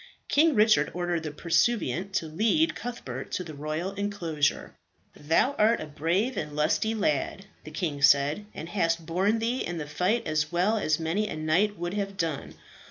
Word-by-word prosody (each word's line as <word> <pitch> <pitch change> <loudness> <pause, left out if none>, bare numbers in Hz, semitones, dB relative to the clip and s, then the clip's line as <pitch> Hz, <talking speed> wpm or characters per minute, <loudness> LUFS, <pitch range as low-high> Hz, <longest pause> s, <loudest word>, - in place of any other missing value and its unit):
King 310 0 +4
Richard 215 0 +4
ordered 175 -1 -1
the 155 -2 -5
pursuivant 170 - 0
to 165 - 0
lead 220 - +2
Cuthbert 135 - -6
to 180 - -1
the 160 -3 -9
royal 155 +5 -3
enclosure. 185 -7 -1 0.4
"Thou 160 - +2
art 220 +2 +4
a - - -5
brave 170 - -1
lad - - 0
and 150 - -10
a - - -8
lusty," 155 +9 +1
the 175 -2 -3
king 155 -3 -3
said, 145 +8 +4
"and 165 - -7
hast 165 -3 0
borne 190 +7 +1
thee 235 +3 -1
in 175 - -3
the 150 - -4
fight 190 +10 0
as 155 0 0
well 180 +6 +2
as 155 -5 +1
many 170 +7 -1
a - - -5
knight 170 +7 +1
would 175 +2 -3
have 200 -1 -3
done. 165 -6 -3
175 Hz, 180 wpm, -27 LUFS, 155-210 Hz, 0.4 s, King